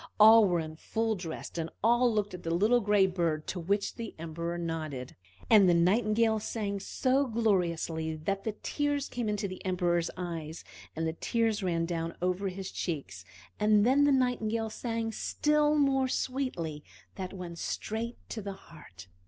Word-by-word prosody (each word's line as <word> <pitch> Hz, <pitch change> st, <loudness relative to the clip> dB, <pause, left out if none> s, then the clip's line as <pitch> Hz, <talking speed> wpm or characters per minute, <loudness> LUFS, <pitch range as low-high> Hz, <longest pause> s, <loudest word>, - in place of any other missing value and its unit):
All 220 Hz, +1 st, +9 dB
were 175 Hz, -3 st, +2 dB
in 155 Hz, -1 st, -6 dB
full 225 Hz, +5 st, -1 dB
dress, 175 Hz, -5 st, -6 dB
and 165 Hz, 0 st, -2 dB
all 240 Hz, +2 st, +4 dB
looked 210 Hz, -2 st, -1 dB
at 180 Hz, -, -7 dB
the 165 Hz, -, -4 dB
little 210 Hz, +9 st, +3 dB
gray 205 Hz, -3 st, +4 dB
bird, 170 Hz, -4 st, -1 dB
to 185 Hz, -, -4 dB
which 200 Hz, +4 st, -1 dB
the 230 Hz, -2 st, -6 dB
Emperor 170 Hz, +1 st, -4 dB
nodded. 155 Hz, -6 st, -4 dB, 0.3 s
And 205 Hz, -5 st, +7 dB
the 175 Hz, -, +5 dB
Nightingale 215 Hz, +5 st, +3 dB
sang 205 Hz, -2 st, -3 dB
so 265 Hz, +7 st, +1 dB
gloriously 170 Hz, -8 st, 0 dB
that 195 Hz, +6 st, -3 dB
the 220 Hz, -, -2 dB
tears 290 Hz, -1 st, -1 dB
came 240 Hz, -3 st, -3 dB
into 210 Hz, -1 st, -1 dB
the 185 Hz, -1 st, -8 dB
Emperor's 175 Hz, -2 st, +1 dB
eyes, 165 Hz, -3 st, -5 dB, 0.3 s
and 160 Hz, +1 st, -2 dB
the 160 Hz, -, -1 dB
tears 225 Hz, +4 st, 0 dB
ran 170 Hz, -3 st, 0 dB
down 165 Hz, -1 st, -3 dB
over 185 Hz, +2 st, 0 dB
his 190 Hz, 0 st, -5 dB
cheeks; 135 Hz, -, -4 dB, 0.4 s
and 210 Hz, 0 st, +4 dB
then 275 Hz, +4 st, +5 dB
the 290 Hz, -, +4 dB
Nightingale 230 Hz, -4 st, +1 dB
sang 230 Hz, -1 st, -3 dB
still 300 Hz, +5 st, +1 dB
more 270 Hz, -2 st, +3 dB
sweetly; 250 Hz, -, -2 dB, 0.3 s
that 185 Hz, -2 st, -5 dB
went 175 Hz, -3 st, -7 dB
straight 230 Hz, +2 st, -3 dB
to 220 Hz, -, -4 dB
the 200 Hz, 0 st, -5 dB
heart. 150 Hz, -, -14 dB
195 Hz, 170 wpm, -30 LUFS, 170-225 Hz, 0.4 s, All